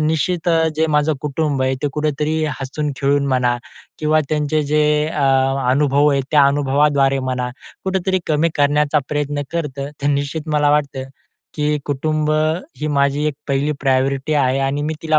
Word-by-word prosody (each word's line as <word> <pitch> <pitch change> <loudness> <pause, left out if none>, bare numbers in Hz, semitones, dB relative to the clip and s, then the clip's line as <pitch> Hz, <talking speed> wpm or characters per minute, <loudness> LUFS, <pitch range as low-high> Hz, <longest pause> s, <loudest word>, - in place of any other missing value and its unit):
निश्चित 160 +3 0
अ, 165 -1 +3
जे 160 0 +2
माझं 150 +1 +2
कुटुंब 145 -2 -1
आहे, 130 0 +1
ते 145 - +1
कुठेतरी 155 +1 -1 0.2
हसून-खेळून 140 0 -1
म्हणा 125 -2 +1 0.4
किंवा 155 0 +2
त्यांचे 150 0 0
जे 150 +1 +1 0.3
अ, 150 - -3 0.5
अनुभव 145 +1 +3
आहे, 140 -1 +2
त्या 145 -2 +5
अनुभवाद्वारे 140 -1 +2
म्हणा, 125 -1 -2 0.4
कुठेतरी 190 0 0
कमी 155 +2 +2
करण्याचा 150 +1 +2
प्रयत्न 145 -1 -2
करतं. 145 -4 -3
तर - - 0
निश्चित 145 +2 -2
मला 145 -1 +3
वाटतं 140 -3 0 0.5
की 150 0 0
कुटुंब, 155 +2 -1 0.5
ही 155 - -1
माझी 140 +2 +1
एक 150 - -1
पहिली 140 +2 +1
प्रायोरिटी 135 +2 +1
आहे 135 -2 +2
आणि 145 +2 -2
मी 155 +1 -2
तिला 155 -1 +3
145 Hz, 155 wpm, -19 LUFS, 140-155 Hz, 0.5 s, त्या